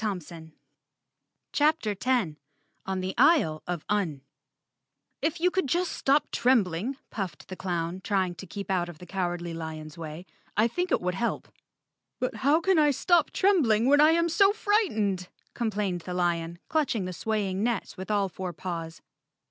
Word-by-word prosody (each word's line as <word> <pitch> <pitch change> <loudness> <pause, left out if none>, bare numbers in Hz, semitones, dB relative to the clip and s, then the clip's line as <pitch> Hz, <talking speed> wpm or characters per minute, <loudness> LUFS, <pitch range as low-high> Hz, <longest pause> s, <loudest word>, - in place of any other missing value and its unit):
128 170 -6 -5 1.0
CHAPTER 300 -7 +2
10 205 -7 0 0.5
On 190 -1 -1
the 185 +1 -3
Isle 160 - +4
of 175 -3 -3
Un 180 -10 0 1.0
"TF 325 +2 0
YOU 360 +2 +3
could 375 -6 0
just 350 +6 0
stop 280 +2 +1
trembling," 235 0 +1
puffed 195 -5 -5
the 185 - -5
clown, 175 -1 -3
trying 190 -4 0
to 185 +2 -10
keep 200 +2 -5
out 175 -2 0
of 170 - -10
the 180 - -11
Cowardly 175 -2 -3
lion's 160 0 -7
way, 160 +2 -7 0.3
"I 215 +2 +5
think 360 +9 -2
it - - +2
would 180 0 -1
help." 235 +6 -2 0.7
"But 255 - -2
how 285 +4 +3
can 380 -2 +3
I 300 -1 +5
stop 330 +3 +3
trembling 275 - +3
when 290 +2 +5
I 310 +2 +7
am 335 0 +3
so 390 +4 +5
fright¬ 420 -1 +2
ened," 195 -4 -1 0.3
complained 205 -6 -1
the 180 +1 -5
lion, 170 -1 0
clutching 270 -11 0
the 185 - -4
swaying 200 -1 -1
net 235 -2 -1
with 190 +1 -8
all 205 -2 +2
four 185 0 -5
paws. 165 -1 -6
195 Hz, 165 wpm, -27 LUFS, 175-275 Hz, 1.0 s, I